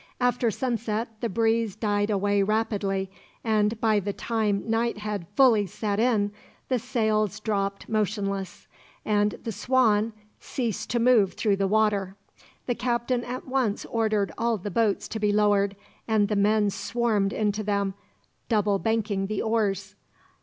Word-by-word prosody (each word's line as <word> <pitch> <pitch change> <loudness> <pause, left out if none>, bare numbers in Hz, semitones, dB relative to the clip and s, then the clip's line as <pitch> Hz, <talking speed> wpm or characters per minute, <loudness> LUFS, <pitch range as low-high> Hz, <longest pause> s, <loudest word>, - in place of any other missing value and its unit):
After 245 -1 +2
sunset 230 -1 -2
the 235 - -1
breeze 225 0 +1
died 205 -1 0
away 205 0 +2
rapidly 195 -2 0 0.3
and, 215 0 +1
by 220 -2 +3
the 200 +1 -3
time 215 -3 -1
night 230 +1 0
had 210 -4 -4
fully 230 -7 +5
set 210 0 -2
in, 220 -4 +2 0.4
the 255 -2 +1
sails 215 -4 0
dropped 200 -2 -2
motionless, 200 -3 -2 0.4
and 210 -1 +2
the 230 - -3
Swan 220 0 +2 0.3
ceased 220 -4 -3
to 240 - +1
move 230 -5 +4
through 205 -3 +1
the 195 0 +1
water. 205 -2 +1 0.5
The 245 - 0
captain 240 0 -1
at 250 +3 -6
once 255 -6 0
ordered 215 -3 0
all 230 -1 +1
the 205 +1 -6
boats 220 0 +1
to 220 - -4
be 210 -1 +2
lowered, 205 -1 +2 0.3
and 215 -2 +2
the 210 - 0
men 205 0 +3
swarmed 220 -3 0
into 210 0 0
them, 200 -1 0 0.6
double 205 -3 +2
banking 215 -3 0
the 215 0 -2
oars. 205 -3 0
215 Hz, 145 wpm, -26 LUFS, 200-230 Hz, 0.6 s, fully